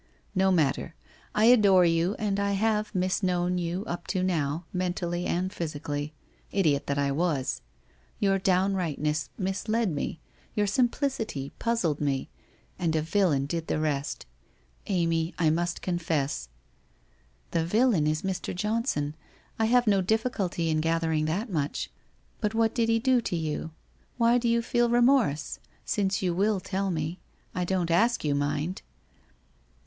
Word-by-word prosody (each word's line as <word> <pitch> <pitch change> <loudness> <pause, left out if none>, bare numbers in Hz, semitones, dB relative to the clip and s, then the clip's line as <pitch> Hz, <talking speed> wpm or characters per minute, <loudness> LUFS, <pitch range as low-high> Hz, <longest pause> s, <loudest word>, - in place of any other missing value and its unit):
No 190 -1 +3
matter! 160 -1 +1 0.4
I 215 - +4
adore 200 -7 +6
you, 170 +4 +2
and 200 -2 -1
I 200 0 +1
have 215 +1 0
mis 185 +2 +1
known 180 -1 +1
you 175 +4 -2
up 175 -4 -5
to 185 -2 0
now, 160 -2 -1
mentally, 175 -1 -1
and 185 +2 -1
physically. 150 -2 -4 0.4
Idiot 155 -8 +1
that 140 - 0
I 140 -1 +1
was! 150 -3 0 0.6
Your 195 -1 +2
downrightness 180 -5 0
mis 195 +2 -3
led 220 -2 +1
me, 150 +2 -3 0.4
your 210 - +2
simplicity 230 - 0
puzzled 190 -11 0
me, 140 -2 -1 0.5
and 165 -3 0
a 155 - +2
villain 160 -5 +2
did 165 +2 -3
the - - 0
rest. 150 -2 -2 0.6
Amy, 165 -3 0
I 160 -3 +3
must 175 +2 -1
confess 160 - -1 0.4
' - - -38
' - - -36
The 165 - +1
villain 210 -3 +3
is 155 0 0
Mr. 190 -2 -3
Johnson, 210 - -1 0.5
I 220 - +3
have 245 +2 +4
no 200 -3 +4
difficulty 195 -5 0
in 155 0 +1
gathering 160 -1 +1
that 185 +10 -1
much. 150 -4 -2 0.5
But 210 0 -1
what 225 0 +2
did 230 -2 +1
he 225 - +4
do 255 +1 +3
to 185 - -2
you? 160 -1 -2 0.5
Why 235 +1 +4
do 235 -1 0
you 235 0 +2
feel 240 0 +2
remorse? 240 - +3 0.3
Since 195 -2 0
you 180 -2 +1
will 200 +3 +2
tell 195 +1 -2
me. 160 0 -2 0.3
I 180 - -1
don't 175 -2 0
ask 230 +8 +3
you, 150 -2 +1
mind 145 +5 -1
180 Hz, 155 wpm, -27 LUFS, 155-210 Hz, 0.6 s, adore